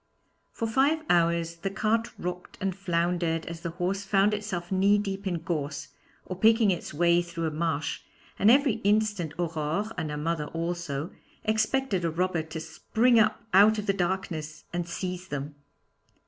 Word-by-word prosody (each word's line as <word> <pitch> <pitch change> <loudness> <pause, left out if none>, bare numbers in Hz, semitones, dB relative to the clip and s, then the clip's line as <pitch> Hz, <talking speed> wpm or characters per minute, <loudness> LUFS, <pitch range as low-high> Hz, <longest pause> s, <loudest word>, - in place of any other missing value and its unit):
For 230 - -3
five 280 +8 +2
hours 170 -1 +2
the 195 +4 -3
cart 220 +3 0
rocked 180 0 -6
and 190 -1 -1
floundered 170 -3 0
as 170 0 -7
the 170 - -3
horse 185 +4 -2
found 200 +1 +3
itself 200 -4 -4
knee 195 +2 +4
deep 195 -1 -3
in 170 -3 -2
gorse 150 -4 -3 0.4
or 185 - -5
picking 220 0 +5
its 175 - -3
way 170 +2 +3
through 170 -1 -4
a 160 - -1
marsh, 160 -1 -1 0.4
and 205 - +5
every 270 -1 +5
instant 205 -5 +1
Aurore 165 +4 -2
and 160 -2 -3
her 150 - -4
mother 155 0 -1
also 165 -2 -3 0.3
expected 220 -2 +1
a 165 - +1
robber 175 +1 0
to 160 +1 -7
spring 225 +9 +2
up 220 +2 +2
out 210 +3 +7
of 210 - -3
the 200 - +2
darkness 175 -4 -3
and 175 -1 -2
seize 180 +1 -4
them. 145 -2 -4
175 Hz, 165 wpm, -27 LUFS, 165-205 Hz, 0.4 s, out